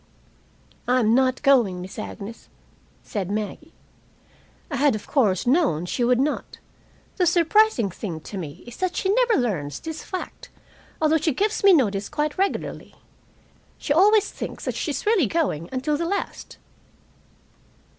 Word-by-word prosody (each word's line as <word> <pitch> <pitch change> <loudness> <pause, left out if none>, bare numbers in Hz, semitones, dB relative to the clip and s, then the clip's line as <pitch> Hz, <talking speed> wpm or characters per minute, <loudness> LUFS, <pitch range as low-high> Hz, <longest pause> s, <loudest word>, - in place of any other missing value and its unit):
"I'm 245 -3 +3
not 260 +1 +2
going, 240 -10 +4
Miss 185 +4 -8
Agnes," 215 +1 -8 0.5
said 195 -4 -4
Maggie. 215 - -5 1.0
(I 280 - -1
had, 280 -2 +3
of 210 - -7
course, 210 - +1
known 250 - +2
she 240 +7 -2
would 245 +1 +3
not. 290 +3 -2 0.6
The 360 - +3
surprising 340 - +3
thing 170 -3 -6
to 200 - -9
me 150 -5 -8
is 240 - -11
that 370 -1 -2
she 385 +1 +1
never 485 0 +3
learns 160 - -1
this 320 -1 -6
fact, 370 - -7 0.5
although 315 0 +3
she 315 -3 0
gives 420 +5 0
me 395 - +8
notice 210 - +2
quite 300 0 -2
regularly. 390 +1 -2 0.8
She 285 - -1
always 410 +5 +4
thinks - - -7
that - - -1
she - - -3
is - - -3
really 415 - +3
going, 200 - -1
until 265 +3 -1
the 335 - -2
last.) 400 +3 -4
270 Hz, 150 wpm, -24 LUFS, 210-340 Hz, 1.0 s, me